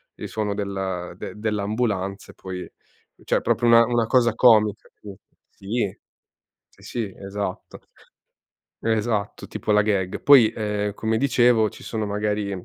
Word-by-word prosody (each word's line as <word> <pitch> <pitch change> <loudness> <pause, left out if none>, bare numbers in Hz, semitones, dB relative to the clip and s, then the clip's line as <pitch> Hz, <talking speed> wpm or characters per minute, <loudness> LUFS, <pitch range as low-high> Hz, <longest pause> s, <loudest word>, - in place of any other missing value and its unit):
il - - -7
suono 105 -2 -2
del 95 -3 -4
de - - -7
dell'ambulanza 105 -2 -2
e - - -25
poi 90 -1 -7 0.5
cioè - - +1
proprio 120 - 0
una 115 0 +7
una 120 -1 +1
cosa 120 -1 +3
comica 110 -4 +4
sì. 100 -2 -10 0.3
Sì 105 +5 -5
eh. 100 -1 -5 0.7
Sì, - - -23
sì 110 -6 -4
esatto. 100 -1 -6 1.0
Esatto, 110 -2 -1
tipo - - -4
la 105 0 +4
gag. 100 -2 -1
Poi, 130 -6 +7
uhm, 105 -2 -2
come 110 0 -1
dicevo 120 -4 +3
ci - - -14
sono 110 -2 -3
magari 105 0 -2
105 Hz, 140 wpm, -23 LUFS, 100-115 Hz, 1.0 s, una